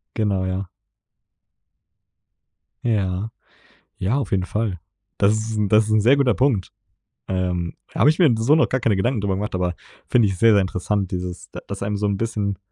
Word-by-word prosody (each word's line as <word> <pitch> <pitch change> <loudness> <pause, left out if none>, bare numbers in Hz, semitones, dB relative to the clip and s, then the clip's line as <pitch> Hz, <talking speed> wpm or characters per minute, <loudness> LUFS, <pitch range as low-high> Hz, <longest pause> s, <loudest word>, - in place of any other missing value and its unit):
Genau, 100 -4 0
ja. 95 0 -3 2.1
Ja, 100 -2 -1 0.7
ja, 110 +9 0
auf 135 - -3
jeden 95 -2 +1
Fall. 105 -4 -2 0.4
Das 100 +1 +3
ist 110 0 -3
'n 105 -2 0
das 110 0 +5
ist 110 - -4
'n 110 -1 +4
sehr 130 +6 +5
guter 135 -3 +3
Punkt. 125 -8 +1 0.6
Ähm, 90 -2 -2 0.2
habe 150 - +5
ich 155 - -1
mir 175 - +6
n 120 - +3
so 115 +7 +3
noch 160 - +3
gar 130 - -1
keine 110 -4 +2
Gedanken 115 +3 0
drüber 100 -2 0
gemacht, 105 0 -4
aber 90 -1 -1 0.3
finde 115 -5 +4
ich 95 - -3
sehr, 115 +4 +5
sehr 100 - +5
interessant, 95 +1 -2
dieses 90 0 -5
d - - -8
dass 100 0 -6
einem 100 +1 -1
so 105 +1 -1
'n 100 -1 -1
bisschen 105 -3 -2
105 Hz, 195 wpm, -22 LUFS, 95-115 Hz, 2.1 s, mir